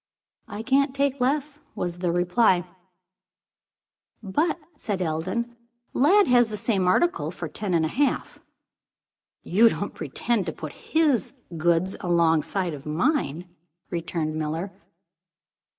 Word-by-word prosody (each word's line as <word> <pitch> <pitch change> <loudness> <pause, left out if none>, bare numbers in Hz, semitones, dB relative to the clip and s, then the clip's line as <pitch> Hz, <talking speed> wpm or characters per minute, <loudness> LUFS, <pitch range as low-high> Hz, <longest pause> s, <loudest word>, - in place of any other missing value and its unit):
"I 210 +2 -6
can't 270 +2 +2
take 280 -1 0
less," 290 +3 0 0.2
was 175 0 -3
replied. 180 +2 +2 1.6
"But," 305 - 0 0.2
said 205 -9 -3
Eldon, 185 +8 -2 0.4
"Lladd 385 +10 +5
has 245 -2 +4
the 210 - -4
same 195 -3 0
article 345 - +2
for - - -6
ten 195 -4 -2
and 160 -1 +2
a - - +1
half." 275 - -1 1.0
"You 225 +6 +5
don't 205 - -4
pretend 190 - -2
to 160 - -2
put 155 -2 -7
his 300 - +1 0.2
goods 170 +3 +1
alongside 170 +1 +1
of 145 0 -9
mine?" 175 - 0 0.4
returned 165 -2 -2
Miller. 160 +4 -3
190 Hz, 120 wpm, -25 LUFS, 170-255 Hz, 1.6 s, Lladd